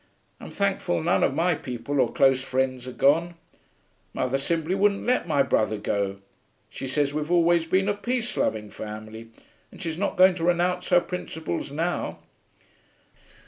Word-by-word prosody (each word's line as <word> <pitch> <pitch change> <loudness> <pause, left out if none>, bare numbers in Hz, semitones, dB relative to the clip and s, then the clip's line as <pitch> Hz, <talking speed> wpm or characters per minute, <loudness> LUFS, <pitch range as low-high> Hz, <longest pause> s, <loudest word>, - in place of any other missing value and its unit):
I'm - - -9
thankful 195 - -1
none 95 - +2
of 135 - +1
my 175 +3 +2
people 130 0 -4
or 125 -3 +2
close 135 -4 +3
friends 130 -1 -2
are - - -5
gone. 165 +7 +2 0.8
Mother 130 +1 0
simply 165 +4 -1
wouldn't 200 +1 +1
let 250 -6 +1
my 145 -4 +3
brother 110 -4 +1
go; 100 -1 -2 0.5
she 135 - -6
says 140 +1 0
we've 150 +2 -3
always 170 -1 +4
been 190 +3 +2
a 205 - +2
peace 240 +3 -3
loving 105 -2 -1
family 110 +1 -8 0.4
and - - -14
she's 165 -3 -4
not 200 - -1
going 185 0 +7
to 165 - -4
renounce 175 +1 +1
her 180 -1 +5
principles 160 - -5
now. 165 +4 -2
155 Hz, 160 wpm, -25 LUFS, 130-180 Hz, 0.8 s, going